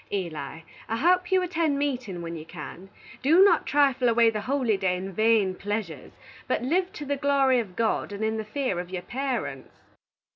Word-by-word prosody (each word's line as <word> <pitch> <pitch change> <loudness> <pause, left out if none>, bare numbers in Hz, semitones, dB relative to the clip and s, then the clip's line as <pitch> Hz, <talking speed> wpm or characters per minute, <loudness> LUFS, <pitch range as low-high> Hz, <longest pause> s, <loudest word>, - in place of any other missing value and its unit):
Eli, 165 -5 -4 0.3
I 225 - -1
hope 360 +6 +2
you 375 -1 +4
attend 330 -5 0
meatin 250 -11 -2
when 170 0 -5
you 155 - -7
can. 175 +3 -10 0.3
Do 320 +8 +6
not 350 -5 +4
trifle 270 -4 +3
away 230 0 +4
the 215 -1 -3
holy 250 -1 +1
day 190 -2 0
in 190 +1 -6
vane 215 -2 +3
pleasures, 200 -6 -5 0.3
but 255 - 0
live 360 +8 +1
to 295 - -7
the 285 0 -1
glory 275 -2 +3
of 195 -6 -5
God, 225 -2 0
and 205 +1 -4
in 220 0 0
the 220 - -3
fear 215 -4 -2
of 175 0 -6
your 180 -1 -5
parents. 240 - -4
230 Hz, 190 wpm, -26 LUFS, 190-280 Hz, 0.3 s, Do